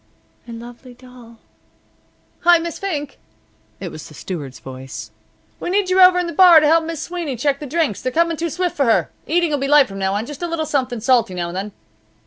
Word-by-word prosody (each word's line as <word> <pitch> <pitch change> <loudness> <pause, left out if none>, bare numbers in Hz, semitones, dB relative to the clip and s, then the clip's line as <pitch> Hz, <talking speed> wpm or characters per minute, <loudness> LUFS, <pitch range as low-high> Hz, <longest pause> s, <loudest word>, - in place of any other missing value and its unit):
"A - - -9
lovely 240 +2 -11
doll 245 -2 -16 0.5
" - - -40 0.2
"Hi, 350 0 +5
Miss 335 0 -5
Fink!" 295 -8 -4 0.6
it - - -6
was 155 - -9
the 155 - -14
steward's 145 -6 -7
voice. 130 -4 -9 0.5
"We - - -4
need 380 0 0
you 375 +1 +4
over 365 0 +7
in 360 - 0
the 340 - -5
bar 350 0 +8
to 305 - +1
help 325 +2 +3
Miss 330 -2 -5
Sweeney 340 -6 -4
check 275 +3 0
the 295 - -7
drinks. 300 - -1
They're 255 - -2
coming 335 +4 +1
too 335 +2 -3
swift 355 +3 -2
for 280 - +1
her. 230 - +2 0.2
The - - -4
eating 345 -2 +2
will 290 - 0
be 275 - -2
light 290 -1 +5
from 195 0 -8
now 190 0 0
on; 210 +2 -2
just 295 +4 -9
a 345 - -2
little 330 -2 -2
something 255 -6 -2
salty 235 -6 +2
now 175 -1 -3
and 175 - -8
then." 200 +3 -4
285 Hz, 235 wpm, -19 LUFS, 230-335 Hz, 0.6 s, bar